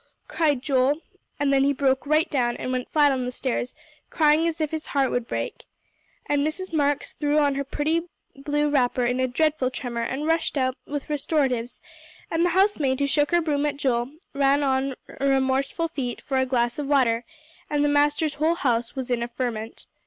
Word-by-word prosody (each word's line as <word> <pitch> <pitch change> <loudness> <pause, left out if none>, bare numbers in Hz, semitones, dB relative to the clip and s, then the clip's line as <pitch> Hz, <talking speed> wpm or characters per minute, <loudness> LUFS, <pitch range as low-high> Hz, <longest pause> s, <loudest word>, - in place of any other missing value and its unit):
cried 295 -6 +1
Joel, 275 +1 +2 0.4
and 280 -1 +2
then 270 0 +4
he 280 +1 +3
broke 265 0 +1
right 310 +2 +3
down, 240 -4 0
and 255 - -4
went 255 -1 -2
flat 295 -2 +4
on 260 -2 -1
the 250 - -3
stairs, 250 -1 -2 0.3
crying 310 0 +3
as 330 -1 -3
if 310 -2 -1
his 315 -1 -3
heart 270 -2 +3
would 245 -1 -1
break. - - -4 0.6
And 290 -1 +1
Mrs. 330 +5 -3
Marks 290 -2 0
threw 295 0 0
on 290 -2 +3
her 280 +1 -2
pretty 315 +5 -1 0.3
blue 295 +2 0
wrapper 250 -3 +2
in 245 +1 0
a 260 - +2
dreadful 300 0 +1
tremor, 245 -2 -4
and 265 +5 -3
rushed 325 -1 0
out 255 -1 +1
with 290 -1 -4
restoratives; 275 -5 -1 0.5
and 325 +1 +1
the 355 - +3
housemaid 305 -10 +2
who 280 - +2
shook 290 +1 +2
her 345 0 +3
broom 295 -3 0
at 285 -1 -3
Joel, 255 -2 0 0.2
ran 280 +1 +3
on 265 -1 0 0.2
remorseful 270 +4 +1
feet 255 -7 -4
for 270 - -2
a 260 - +1
glass 240 0 0
of 290 - -3
water, 245 -5 +2 0.5
and 295 -1 +1
the - - +3
master's 290 +1 +2
whole 325 +2 +3
house 240 -6 0
was 260 -2 -4
in 240 -1 +1
a 235 - -1
ferment. 235 -2 -4
280 Hz, 195 wpm, -24 LUFS, 255-295 Hz, 0.6 s, then